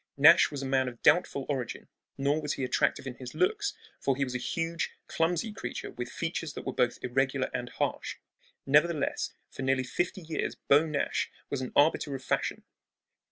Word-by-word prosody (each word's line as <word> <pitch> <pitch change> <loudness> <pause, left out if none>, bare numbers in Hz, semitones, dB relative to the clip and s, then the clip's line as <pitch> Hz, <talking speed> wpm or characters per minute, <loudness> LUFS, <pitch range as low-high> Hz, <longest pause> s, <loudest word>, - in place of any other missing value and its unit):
Nash 155 +5 +8
was 140 -2 -5
a - - -3
man 130 -1 +2
of 120 -2 -6
doubtful 150 -3 +4
origin; 130 -5 -3 0.3
nor 140 +3 +1
was 150 -1 -1
he 135 - -3
attractive 130 - +1
in 130 - -4
his 125 -2 -8
looks, 410 +2 +1 0.2
for 135 - +1
he 140 - 0
was 130 -2 -3
a 125 - -1
huge, 165 +5 -2 0.2
clumsy 175 +6 0
creature - - -5
with 120 0 -5
features 165 -2 -3
that - - -7
were 130 - -2
both 125 -2 +1
irregular 130 +1 0
and 125 -1 -3
harsh. - - -2 0.5
Nevertheless, 150 +2 +2 0.2
for - - -7
nearly 130 0 +2
fifty 175 +8 -2
years 160 -1 -3
Beau 145 +3 +4
Nash 150 -2 0 0.2
was 140 - -1
an 130 - -4
arbiter 145 -1 +3
of 135 - -7
fashion. - - -1
140 Hz, 185 wpm, -30 LUFS, 130-165 Hz, 0.5 s, Nash